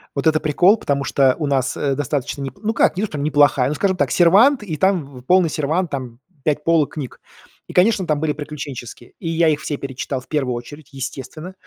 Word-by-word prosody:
Вот 140 +3 0
это 155 -1 +3
прикол, 180 +8 +4
потому 140 -5 -1
что 135 -1 +3
у 150 - -1
нас, 135 -2 0
э, 140 -2 0
достаточно 140 0 -3
не 135 -2 -4
ну 220 +1 0
как, - - +2
не 205 - 0
то - - 0
что 150 - -6
неплохая, 145 -3 +3
ну 150 - -2
скажем 190 +2 0
так, - - 0
сервант, 210 +9 +5
и 165 -6 -4
там 145 -7 0
полный 180 +1 +3
сервант, 160 +4 -1
там 125 -3 -5 0.2
5 150 -1 0
полок 165 -3 +2
книг. 140 -5 -7 0.5
И, - - -10
конечно, 190 0 +3
там 150 -2 +1
были 155 -1 0
приключенческие, 140 -5 -8
и 165 - -4
я 165 0 +2
их 150 -1 0
все 145 - -3
перечитал 135 0 -4
в - - -20
первую 130 -5 -1
очередь, 140 +5 -10
естественно. 135 +6 -7
150 Hz, 215 wpm, -20 LUFS, 135-170 Hz, 0.5 s, сервант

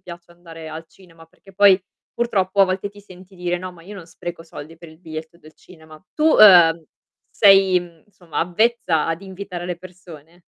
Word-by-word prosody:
piace 175 -1 -13
andare 165 -2 -12
al 160 +1 -9
cinema, 165 -3 -20
perché 180 +4 -22
poi 195 -1 +5 0.3
purtroppo 200 -5 -1
a 195 - +8
volte 185 +2 -4
ti 205 0 -16
senti 190 -1 -17
dire: 175 0 -3
"No, 185 +1 -8
ma 170 -2 -17
io 200 +5 -12
non 180 -5 -11
spreco 175 0 -9
soldi 165 0 -12
per 170 -1 -14
il 160 - -19
biglietto 160 0 -10
del 155 -2 -18
cinema". 160 -3 -17 0.2
Tu, 315 +1 +2
ehm, 170 -6 +7 0.5
sei, 195 -3 +4
mhmm, 170 -2 -15
insomma 180 -5 -9
avvezza 180 -2 0
ad 165 +3 -4
invitare 190 -2 -8
le 175 -1 -5
persone? 175 -2 -15
175 Hz, 190 wpm, -20 LUFS, 165-190 Hz, 0.5 s, a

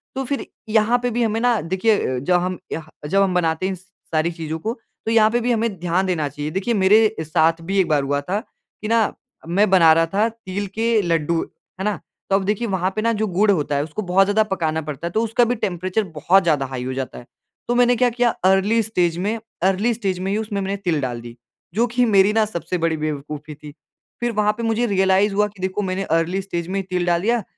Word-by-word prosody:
तो 270 - -2
फिर 280 +2 -3 0.2
यहाँ 220 +2 +3
पे 245 - +1
भी 240 +1 0
हमें 220 0 0
ना 240 -2 +3
देखिए, 185 - 0
जब 160 +8 0
हम 185 0 -2
यह 155 -1 -5 0.2
जब 195 +5 +2
हम 195 -2 +2
बनाते 165 -1 0
हैं 190 - 0
इन - - -5
स 185 +1 -18 0.3
सारी 160 +2 +1
चीज़ों 160 -1 -5
को 220 +7 -2 0.3
तो 225 - 0
यहाँ 220 -1 +5
पे 240 - +1
भी 245 +1 0
हमें 225 -5 -1
ध्यान 175 +2 0
देना 170 -5 0
चाहिए। 145 +2 -5
देखिए 195 +7 -1
मेरे 215 +2 +4
साथ 165 +2 +2
भी 195 +4 -2
एक 185 - +3
बार 150 -3 +2
हुआ 145 +1 0
था 185 +8 -2 0.4
कि 215 - -4
ना 230 +1 +3 0.5
मैं 200 +4 +2
बना 175 -4 +6
रहा 165 +1 +3
था 210 +3 +3
तिल 205 -3 -5
के 225 0 +2
लड्डू। 165 -2 0 0.4
है - - -2
ना, 210 - +1 0.3
तो 195 - +3
अब 195 - +1
देखिए 210 +4 -1
वहाँ 190 -2 0
पे 215 - -1
ना 230 +1 +1
जो 220 - +1
गुड़ 205 +3 +2
होता 150 -6 0
है 140 - +1
उसको 160 +7 -5
बहुत 190 0 +3
ज़्यादा 210 +2 +3
पकाना 165 -6 -1
पड़ता 150 +1 -5
है, 170 - -5
तो 220 +4 +1
उसका 230 +2 +2
भी 245 +1 0
टेंपरेचर 185 -1 -1
बहुत 190 +6 +4
ज़्यादा 150 -5 +1
हाई 130 -1 -5
हो 130 +1 -3
जाता 130 0 -5
है। 120 - -11 0.4
तो 240 - +1
मैंने 245 0 +4
क्या 250 +1 +3
किया 240 0 +1 0.2
अर्ली 195 +4 +3
स्टेज 180 -6 0
में, 210 +5 -1 0.2
अर्ली 195 +5 +2
स्टेज 195 -5 -2
में 190 +1 -2
ही 205 - 0
उसमें 215 -2 -3
मैंने 195 +1 -2
तिल 175 -6 -1
डाल 120 -3 -3
दी, 120 0 -10 0.4
जो 235 +4 +2
कि 245 +1 +1
मेरी 200 -2 +4
ना 220 0 +3
सबसे 180 -3 -4
बड़ी 165 -1 0
बेवकूफी 150 0 -5
थी। 145 0 -12 0.5
फिर 240 0 -1
वहाँ 210 -1 +1
पे 235 - -4
मुझे 225 +1 +1
रियलाइज़ 195 +1 +2
हुआ 210 +1 +2
कि 200 -2 -15
देखो 190 +2 -1
मैंने 190 0 -2
अर्ली 165 +2 0
स्टेज 175 -3 -4
में 195 +2 -2
ही - - -3
तिल 180 -1 -1
डाल 170 -1 +2
दिया 230 +2 +1
190 Hz, 245 wpm, -21 LUFS, 165-215 Hz, 0.5 s, बना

